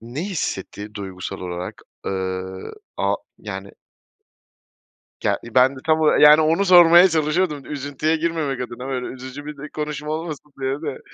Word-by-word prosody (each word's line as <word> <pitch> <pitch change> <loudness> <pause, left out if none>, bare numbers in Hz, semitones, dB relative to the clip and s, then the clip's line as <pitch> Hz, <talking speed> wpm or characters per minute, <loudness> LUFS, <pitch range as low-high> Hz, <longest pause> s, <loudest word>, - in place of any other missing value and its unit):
ne 120 +6 -6
hissetti 105 - -4
duygusal 95 -3 -6
olarak? 90 0 -6 0.2
Iıı, 95 0 -4 0.2
a - - +1 0.2
yani, - - -7 1.5
yani - - +2 0.2
ben 130 +2 +5
de - - -9
tam 155 0 +3
ola 155 - +4
yani 150 +1 +8
onu 165 +6 +2
sormaya 175 -1 +8
çalışıyordum, 155 -1 0
üzüntüye 145 +2 -1
girmemek 160 -5 -1
adına 125 +1 -6
böyle 130 -2 -3
üzücü 130 +3 -8
bir 150 0 -8
konuşma 150 0 -5
olmasın 155 -2 -5
diye 135 0 0
de. 145 -4 -4
145 Hz, 140 wpm, -22 LUFS, 125-155 Hz, 1.5 s, yani